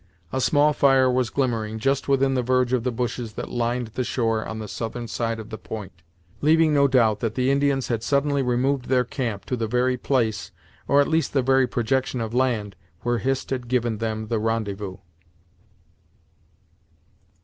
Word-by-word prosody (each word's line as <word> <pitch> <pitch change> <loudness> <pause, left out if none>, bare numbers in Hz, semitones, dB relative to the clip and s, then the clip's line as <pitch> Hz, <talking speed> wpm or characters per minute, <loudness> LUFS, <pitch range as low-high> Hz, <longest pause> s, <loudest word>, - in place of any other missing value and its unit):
A 130 - 0
small 150 +2 +3
fire 135 -2 +4
was 125 -2 +1
glimmering 115 -5 -1
just 135 +5 0
within 135 -1 +2
the 130 - +1
verge 125 0 +1
of 125 -3 +1
the 125 - 0
bushes 120 -1 -3
that - - -6
lined 120 0 -1
the 125 +3 -3
shore 115 -2 0
on 110 - -6
the 110 -1 -6
southern 120 +2 -5
side 115 0 -2
of 110 +1 -9
the 110 - -6
point 105 -4 -7 0.5
leaving 160 +1 +4
no 140 -1 +5
doubt 115 -6 +3
that 115 -2 -2
the 130 +1 +2
Indians 140 -1 +1
had 115 -3 0
suddenly 140 +2 +1
removed 125 +1 0
their 125 0 +2
camp 115 -5 -4
to 125 - -2
the 115 -2 -2
very 125 +2 +1
place, 120 -4 0 0.4
or 140 +1 +5
at 140 - +1
least 160 0 0
the 135 -2 +2
very 130 0 +3
projection 130 +2 -1
of 115 -1 -4
land 120 -5 0 0.3
where 120 -1 0
Hist 135 +3 -2
had 125 -2 -3
given 120 -3 0
them 110 -1 -2
the 110 0 -1
rendezvous! 105 -3 -2
125 Hz, 180 wpm, -24 LUFS, 115-135 Hz, 0.5 s, no